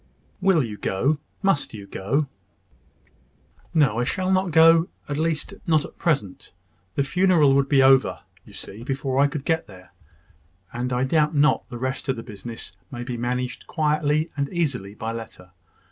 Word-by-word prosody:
"Will 185 -5 +4
you 105 -3 -6
go? 135 +11 0 0.2
Must 195 -11 +1
you 100 -2 -8
go?" 110 +10 -1 1.5
"No, 140 -8 +3
I - - +2
shall 185 +8 -1
not 185 0 +2
go 165 +1 +6 0.2
at 145 - -3
least, 160 +4 -1
not 155 -2 +3
at - - -14
present. 135 - -1 0.4
The 140 - +2
funeral 170 -2 +4
would 140 0 +2
be 135 -2 +5
over, 135 0 +4 0.2
you - - -16
see, 110 +4 -9
before 135 0 -1
I 140 - +5
could 145 -1 -5
get 160 0 0
there; 90 -2 -15 0.8
and 125 +1 -3
I 125 +1 +1
doubt 150 +3 +2
not 145 +1 +3
the 120 - -6
rest 130 +2 -3
of 135 - +2
the 115 - -7
business 115 -3 -8
may 120 -2 -6
be 125 0 -4
managed 125 +1 -3
quietly 150 0 +1
and 140 -1 -1
easily 130 - -2
by 110 +1 -4
letter. 110 -6 -9
140 Hz, 170 wpm, -24 LUFS, 120-155 Hz, 1.5 s, go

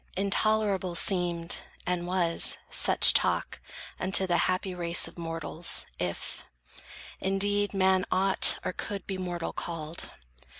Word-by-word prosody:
Intolerable 200 -2 0
seemed, 175 -2 +1 0.2
and 180 -1 -2
was, 175 -2 +1
such - - +7
talk - - 0 0.4
Unto 190 0 +1
the 175 -2 0
happy 185 +1 -2
race 170 -1 -1
of - - -13
mortals, 165 0 -2
if, 90 -1 -5 0.8
Indeed, 205 +1 0
man 190 -1 +2
ought 190 +1 +3
or - - -2
could 200 +1 -6
be 190 -1 -5
mortal 175 -2 -5
called. 165 -1 -6
185 Hz, 120 wpm, -27 LUFS, 170-195 Hz, 0.8 s, such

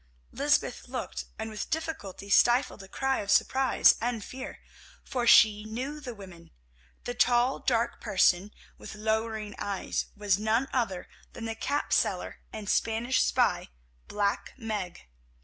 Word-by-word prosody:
Lysbeth - - 0
looked, 60 -1 -5
and 220 - -5
with 215 - -5
difficulty 305 - -4
stifled 240 0 +4
a 195 - -11
cry 265 +6 -1
of 200 - -5
surprise 265 +4 +4
and 235 -2 -2
fear, 260 0 -8 0.5
for 245 -2 -2
she 210 -2 +7
knew 255 +7 -5
the 250 -5 -7
women. 180 -5 -12 0.5
The 245 - -4
tall, 245 +2 +3
dark 235 -2 0
person, 185 +1 +3 0.3
with - - -9
lowering 220 0 -2
eyes, 200 -2 -2
was 200 -2 +1
none 225 +5 +1
other 220 -8 -1 0.3
than 230 - -7
the 225 - -2
cap 280 +6 -2
seller - - 0
and 215 -2 -7
Spanish 230 +5 +1
spy, - - +1 0.4
Black 205 -1 -1
Meg. 210 - -5
220 Hz, 140 wpm, -28 LUFS, 200-245 Hz, 0.5 s, she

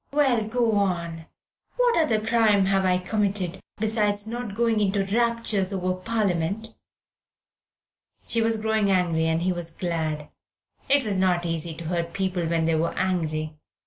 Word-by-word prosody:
"Well, 270 -6 +2
go 235 0 +1
on. 170 -4 -2 0.5
What - - +3
other 270 -10 +2
crime 220 -3 +3
have 195 0 +2
I 180 -1 +3
committed 195 -2 -1 0.2
besides 210 -1 0
not 230 -2 -5
going 230 -1 +2
into 200 -1 +1
raptures 225 -2 0
over 185 -1 -1
Parliament?" 200 +1 -2 1.5
She 230 - +2
was 225 0 +2
growing 220 -1 +1
angry, 170 -4 +2
and 160 +1 0
he 185 0 +1
was 175 -1 -2
glad. 160 -4 -3 0.6
It 280 -2 +4
is 200 -3 0
not 180 -2 +2
so 170 - -2
easy 165 0 -3
to 165 +1 -8
hurt 170 0 -2
people 185 -3 -1
when 165 0 +1
they 165 - +2
are 160 +1 -1
angry. 155 -4 -2
195 Hz, 155 wpm, -25 LUFS, 170-220 Hz, 1.5 s, It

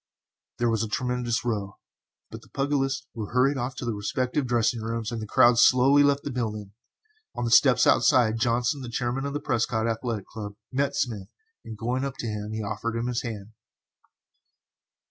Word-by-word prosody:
There 120 -1 +1
was 115 -2 0
a - - -2
tremendous 120 +1 -2
row, 105 -4 -3 0.5
but - - -8
the - - -20
pugilists 135 -1 -1
were 110 -3 -6
hurried 135 +2 +3
off 125 +1 -3
to - - -6
their 115 - -1
respective 125 +6 -2
dressing 120 -1 +1
rooms, 115 0 -3
and 115 -1 -4
the 110 - -6
crowd 120 +1 +5
slowly 135 +4 +6
left 140 0 +3
the 145 - -4
building. 105 -5 -4 0.6
On 120 - -2
the 115 - -2
steps - - +6
outside, 115 -3 +4
Johnson, 120 +3 0
the 125 - -6
chairman 125 +3 -2
of 140 - -5
the 145 - -2
Prescott 115 -3 0
Athletic 115 -2 -3
Club, 105 -2 -8 0.2
met 140 +1 0
Smith, 110 -6 -2 0.4
and, 110 - -8
going 125 +4 -2
up 135 -1 -4
to - - -5
him, 105 -1 -4
he 110 0 -3
offered 110 +2 -3
him 115 +1 -2
his 125 -1 -1
hand. 110 -3 -7
120 Hz, 185 wpm, -26 LUFS, 110-130 Hz, 0.6 s, slowly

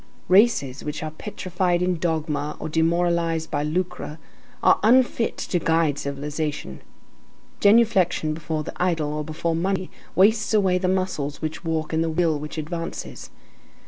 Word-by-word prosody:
Races 185 - +3
which 150 +1 -4
are 155 - -4
petrified 180 0 -1
in 180 -2 0
dogma 150 -3 -2
or 155 - -4
demoralized 165 0 +1
by 145 - 0
lucre 155 0 -3 0.5
are - - +5
unfit 240 +1 +3
to 175 - -1
guide 160 -3 +1
civilization. 145 - -4 0.8
Genuflection 200 -7 +4
before 155 0 -3
the - - -7
idol 160 -5 0
or 150 0 -2
before 160 +2 -2
money 185 +2 -1 0.2
wastes 215 +3 +4
away 190 -3 +3
the 185 - 0
muscles 185 -6 -1
which 155 +3 -4
walk 160 -1 -2
and 160 +1 +2
the 165 - -1
will 160 -2 +1
which 150 +2 -7
advances. 165 +2 -5
165 Hz, 145 wpm, -24 LUFS, 155-185 Hz, 0.8 s, are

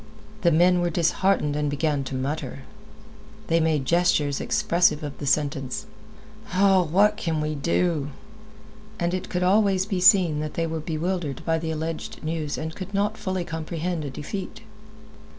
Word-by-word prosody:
The 175 -3 +4
men 175 +3 +4
were 175 - +1
disheartened 170 -2 +1
and 150 0 0
began 145 -1 0
to 130 - -5
mutter. 135 0 -4 0.8
They 165 - +2
made 155 -4 +1
gestures 155 -3 +2
expressive 180 -9 +2
of 145 -2 -5
the 145 - -4
sentence: 135 -3 0 0.7
"Ah, 195 0 +5
what 165 -4 -4 0.2
more - - -17
can 160 -2 -2
we 150 0 -1
do?" 155 0 0 0.9
And 170 0 0
it 185 0 -3
could 180 0 -1
always 195 0 +3
be 195 -3 -2
seen 185 -6 +5
that 150 0 -4
they 165 - 0
were 160 0 -3
bewildered 160 -1 -3
by 165 -1 +1
the 160 0 -4
alleged 160 +1 -4
news 155 -2 -3
and 160 +1 -4
could 195 +1 -7
not 205 +2 +1
fully 190 -4 -3
comprehend 165 0 -3
a 145 - -4
defeat. 190 - -6
165 Hz, 165 wpm, -25 LUFS, 150-180 Hz, 0.9 s, Ah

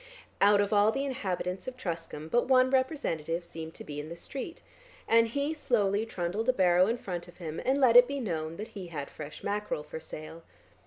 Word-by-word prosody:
Out 205 0 +6
of 205 +1 0
all 205 +1 +5
the 275 +4 -1
inhabitants 190 -8 -3
of 255 0 -5
Truscombe 165 -6 -5
but 240 +1 +3
one 260 -1 +5
representative 175 - 0
seemed 160 -1 -8
to - - -8
be 145 -1 -6
in 150 +1 -6
the 170 - -6
street, 275 - -7 0.4
and 230 0 +5
he 280 +6 -1
slowly 220 -7 +1
trundled 200 +4 -2
a - - +5
barrow 180 -3 +4
in 230 +2 0
front 180 -6 -5
of 175 - -15
him 165 -3 -5
and 270 +2 +2
let 250 -4 +5
it 245 0 +10
be 280 0 -3
known 165 -8 -3
that 215 - -6
he 190 -4 -8
had 145 -4 -6
fresh 150 -1 -9
mackerel 205 -6 -2
for 160 - -7
sale. 160 +1 -9
200 Hz, 210 wpm, -30 LUFS, 165-245 Hz, 0.4 s, it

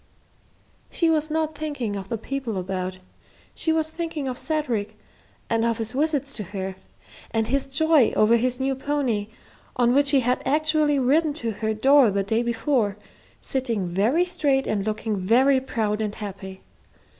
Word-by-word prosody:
She 335 -2 +1
was 310 -1 0
not 315 0 -1
thinking 285 -8 -3
of 195 -1 -6
the 230 - -2
people 245 -2 -4
about; 185 0 -3 0.6
she 320 - -1
was 315 0 0
thinking 325 -4 -4
of 255 - -3
Cedric, 240 -9 -2 0.5
and 225 0 +1
of 230 -1 +1
his 225 -2 -2
visits 280 0 0
to 210 - -3
her, 190 0 -5 0.5
and 225 0 0
his 275 +3 0
joy 290 -2 +4
over 215 +2 +4
his 250 +2 0
new 270 +1 0
pony, 265 -6 -1 0.5
on 245 -1 +3
which 285 +1 +4
he 275 -2 +4
had 250 +1 0
actually 305 0 +2
ridden 290 +4 +2
to 235 -7 -2
her 220 +1 -2
door 270 +2 +5
the 200 0 0
day 220 +4 0
before, 235 -3 0 0.5
sitting 235 -8 -1
very 215 - +1
straight 290 -7 +1
and 205 -1 -2
looking 215 0 -2
very 250 +8 +3
proud 220 -4 -2
and 210 -1 -3
happy. 190 -2 -8
245 Hz, 165 wpm, -24 LUFS, 215-290 Hz, 0.6 s, door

